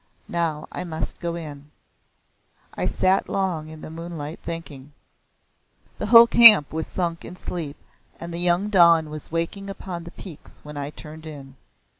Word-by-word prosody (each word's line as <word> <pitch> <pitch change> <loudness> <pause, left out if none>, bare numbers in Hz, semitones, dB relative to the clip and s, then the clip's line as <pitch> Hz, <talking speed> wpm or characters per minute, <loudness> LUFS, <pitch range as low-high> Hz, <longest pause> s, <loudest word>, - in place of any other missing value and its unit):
Now 165 -3 -1
I - - -5
must 160 -3 -4
go 170 -1 -3
in." 150 -3 -9 1.0
I - - -2
sat 185 +1 +1
long 180 -5 -2
in 155 0 -11
the - - -9
moonlight 165 -1 -7
thinking. 150 -4 -8 1.1
The 210 - -3
whole 230 +1 +9
camp 225 -11 +8
was 160 0 -3
sunk 170 -2 -3
in - - -9
sleep 160 -5 -6 0.4
and 170 0 -7
the 170 - -4
young 175 +3 +1
dawn 170 -5 +5
was 155 +1 -9
waking 170 +4 -3
upon 180 -3 -7
the - - -8
peaks 175 -7 -12
when 150 0 -9
I 145 0 -4
turned 155 +1 -11
in. 135 -3 -10
165 Hz, 160 wpm, -23 LUFS, 155-180 Hz, 1.1 s, whole